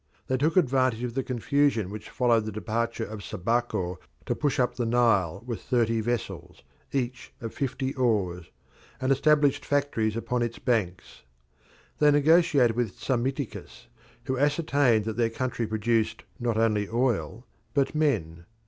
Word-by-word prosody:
They 130 - 0
took 155 +6 +1
advantage 130 -7 +2
of 120 -1 -3
the 135 - 0
confusion 130 -4 0
which 105 0 -8
followed 120 -3 +2
the 110 - -4
departure 115 +2 -2
of 105 -1 -8
Sabaco 100 -3 -1 0.3
to - - 0
push 145 -3 -1
up 125 - +2
the 120 - -2
Nile 110 -6 +2
with 120 -3 -4
thirty 115 -3 +1
vessels, 120 +2 -4 0.3
each 125 -2 -3
of 115 -1 -6
fifty 135 -1 -2
oars, 100 - 0 0.5
and 130 +1 0
established 145 0 +3
factories 115 -7 0
upon 120 +1 -1
its 115 -1 -2
banks. 95 - -2 0.8
They 150 - +6
negotiated 145 -5 +4
with 120 -4 -2
Psammiticus, 130 - -3 0.3
who 130 -1 -2
ascertained 140 -6 +2
that 110 -1 -4
their 115 -1 +2
country 120 0 -2
produced 110 +1 0 0.2
not 120 -2 -1
only 105 -3 +1
oil 120 0 -1 0.3
but 140 -1 +2
men. 85 - 0
120 Hz, 145 wpm, -27 LUFS, 110-135 Hz, 0.8 s, They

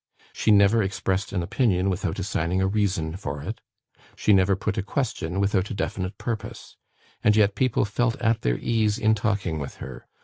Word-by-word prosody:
She - - -1
never 105 +2 +5
expressed 95 0 -1
an 90 -4 -1
opinion 95 -2 +1
without 95 -1 -1
assigning 95 -2 -1
a 95 - +2
reason 95 -5 0
for 70 -6 -5
it; - - -6 0.5
she 105 - +3
never 95 0 +4
put 100 +1 -2
a 105 - 0
question 100 - -2
without 100 -1 +1
a - - -4
definite 95 0 -3
purpose; 115 -3 -5 0.5
and 105 - +5
yet 105 -2 +4
people 130 -3 +1
felt 115 +3 0
at 115 -1 0
their - - +1
ease 110 -2 +1
in 110 -2 +3
talking 100 -7 -1
with 70 - -6
her. 65 - -9
100 Hz, 180 wpm, -25 LUFS, 95-110 Hz, 0.5 s, never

